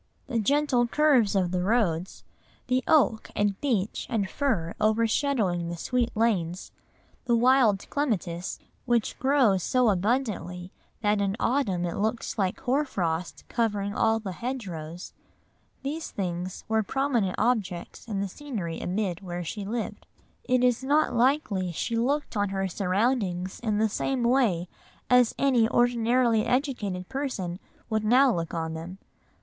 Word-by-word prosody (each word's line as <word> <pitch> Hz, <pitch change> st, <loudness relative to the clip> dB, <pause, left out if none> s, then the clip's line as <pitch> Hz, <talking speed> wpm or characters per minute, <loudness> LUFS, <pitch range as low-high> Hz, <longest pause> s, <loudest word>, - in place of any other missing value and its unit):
The 245 Hz, -4 st, -1 dB
gentle 270 Hz, +1 st, +2 dB
curves 260 Hz, -7 st, +3 dB
of 185 Hz, -3 st, +1 dB
the 180 Hz, -1 st, 0 dB
roads, 190 Hz, -4 st, 0 dB, 0.4 s
the 255 Hz, +1 st, +1 dB
oak 265 Hz, -8 st, +3 dB
and 205 Hz, -1 st, 0 dB
beech 220 Hz, -8 st, -1 dB
and 220 Hz, -6 st, 0 dB
fir 190 Hz, -9 st, -1 dB
overshadowing 215 Hz, -, +1 dB
the 170 Hz, -, -5 dB
sweet 245 Hz, +6 st, 0 dB
lanes, 185 Hz, -6 st, 0 dB, 0.5 s
the 240 Hz, -1 st, +3 dB
wild 235 Hz, -4 st, +4 dB
clematis, 185 Hz, -, -2 dB, 0.3 s
which 240 Hz, -3 st, 0 dB
grows 260 Hz, -8 st, +3 dB
so 250 Hz, +4 st, +2 dB
abundantly 190 Hz, -4 st, -1 dB, 0.3 s
that 210 Hz, -1 st, +2 dB
in 200 Hz, 0 st, 0 dB
autumn 205 Hz, -9 st, +1 dB
it 170 Hz, -, -3 dB
looks 220 Hz, +2 st, -2 dB
like 190 Hz, -2 st, 0 dB
hoar 265 Hz, +3 st, +1 dB
frost 175 Hz, -, -3 dB
covering 205 Hz, -4 st, -1 dB
all 225 Hz, +1 st, +2 dB
the 205 Hz, -4 st, -5 dB
hedgerows, 180 Hz, -7 st, -6 dB, 0.7 s
these 310 Hz, +4 st, -4 dB
things 180 Hz, -1 st, -4 dB
were 220 Hz, 0 st, +2 dB
prominent 240 Hz, -5 st, 0 dB
objects 210 Hz, -5 st, -1 dB
in 200 Hz, -3 st, -2 dB
the 200 Hz, -, -1 dB
scenery 195 Hz, -, -5 dB
amid 185 Hz, -1 st, -2 dB
which 175 Hz, -2 st, -5 dB
she 205 Hz, +4 st, -5 dB
lived. 225 Hz, +2 st, -4 dB, 0.4 s
It 255 Hz, -1 st, +2 dB
is 250 Hz, 0 st, +2 dB
not 290 Hz, 0 st, +2 dB
likely 235 Hz, -, +1 dB
she 230 Hz, +7 st, -2 dB
looked 270 Hz, +4 st, 0 dB
on 205 Hz, -1 st, +1 dB
her 195 Hz, 0 st, -1 dB
surroundings 190 Hz, -1 st, -1 dB
in 215 Hz, -3 st, -1 dB
the 220 Hz, +1 st, +3 dB
same 250 Hz, +4 st, -1 dB
way 235 Hz, -9 st, +2 dB, 0.4 s
as 250 Hz, -2 st, +5 dB
any 245 Hz, -5 st, +3 dB
ordinarily 240 Hz, -1 st, +3 dB
educated 225 Hz, -9 st, -1 dB
person 250 Hz, -11 st, -3 dB, 0.3 s
would 220 Hz, -2 st, -1 dB
now 250 Hz, +3 st, +5 dB
look 165 Hz, 0 st, -3 dB
on 160 Hz, -1 st, -2 dB
them. 165 Hz, +4 st, -7 dB
220 Hz, 145 wpm, -27 LUFS, 185-250 Hz, 0.7 s, as